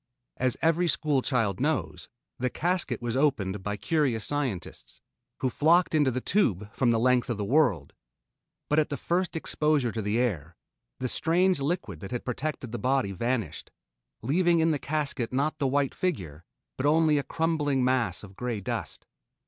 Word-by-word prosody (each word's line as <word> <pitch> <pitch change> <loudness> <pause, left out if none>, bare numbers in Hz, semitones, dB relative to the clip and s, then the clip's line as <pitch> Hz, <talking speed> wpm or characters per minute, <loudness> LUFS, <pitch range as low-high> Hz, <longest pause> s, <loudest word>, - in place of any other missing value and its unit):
As 130 -1 0
every 165 +2 +3
school 150 -4 +2
child 115 -8 0
knows, 155 +4 -2 0.3
the 125 +1 0
casket 175 -3 -1
was 120 0 -2
opened 105 -9 +1
by 105 +1 -3
curious 125 -3 0
scientists, 130 - -3 0.4
who 130 - +2
flocked 170 +7 +3
into 150 -3 +4
the 130 0 -1
tube 105 - 0
from 130 - +1
the 115 - +3
length 125 +2 +2
of 120 - -1
the 105 - -2
world, 115 - +2 0.7
but 150 - +3
at 155 - +1
the 140 - -3
first 180 0 -1
exposure 150 -5 +1
to 110 - -3
the 105 +2 0
air, 85 - -1 0.4
the 130 - -1
strange 175 +6 +2
liquid 135 - -2
that 95 - -8
had 125 0 -4
protected 130 -1 -3
the 120 - -4
body 130 -3 +1
vanished, 110 - -2 0.5
leaving 170 +6 +3
in 160 0 +3
the 150 - 0
casket 140 -6 -2
not 145 +4 0
the 140 - +1
white 140 0 +1
figure, 90 - -3 0.3
but 130 - 0
only 155 -1 +4
a - - -2
crumbling 150 -5 0
mass 125 -4 +1
of 95 -2 -12
grey 120 0 -3
dust. 95 - -4
130 Hz, 175 wpm, -27 LUFS, 115-155 Hz, 0.7 s, into